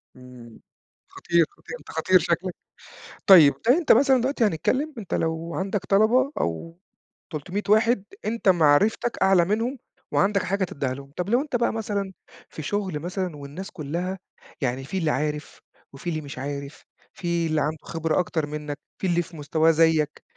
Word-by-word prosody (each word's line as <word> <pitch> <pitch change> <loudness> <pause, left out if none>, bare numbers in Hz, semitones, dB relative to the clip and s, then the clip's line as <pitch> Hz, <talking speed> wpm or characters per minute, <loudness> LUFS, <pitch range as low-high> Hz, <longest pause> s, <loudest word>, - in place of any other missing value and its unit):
امم. 125 -3 -14 0.5
خطير 170 -1 +1
خطير، - - -10
أنت 145 - -17
خطير 185 +3 +3
شكلّك. 175 +2 -1 0.7
طيّب، 165 -7 +9 0.2
أنت 310 +6 +4
مثلًا 265 +1 +5
دلوقتي 260 0 0
هنتكلّم 255 - 0
أنت 205 -5 -6
لو 165 +1 -2
عندك 195 +1 -2
طلبة، 230 +7 +3
أو 165 - -3 0.5
300 180 +7 -4
واحد 220 0 +4 0.2
أنت 220 -2 +1
معرفتك 180 +8 +3
أعلى 190 -3 +5
منهم، 225 +8 -1 0.3
وعندك 200 -1 +2
حاجة 195 0 -1
تديها 140 -8 -2
لهم. 140 +1 -10
طب 180 +2 -2
لو 240 +4 +3
أنت 290 -3 -4
بقى 235 -1 +1
مثلًا 205 -3 -3 0.4
في - - -8
شغل 190 -2 -2
مثلًا، 180 0 -4
والناس 145 +7 -8
كلّها 175 +4 -4 0.4
يعني 130 0 -1
في 180 +8 -4
اللي 165 -4 +1
عارف، 150 +1 -3 0.3
وفي 140 +6 -6
اللي 155 -2 -2
مش 140 -3 -9
عارف، 140 +1 -6 0.3
في 170 -2 -1
اللي 155 -1 0
عنده 155 +2 -1
خبرة 165 0 -1
أكتر 165 -3 -1
منّك، 150 -1 -5 0.2
في 190 - -2
اللي 175 -1 +2
في 170 -1 -11
مستواه 155 +2 +2
زيك، 160 -2 +2
170 Hz, 160 wpm, -24 LUFS, 150-200 Hz, 0.7 s, طيّب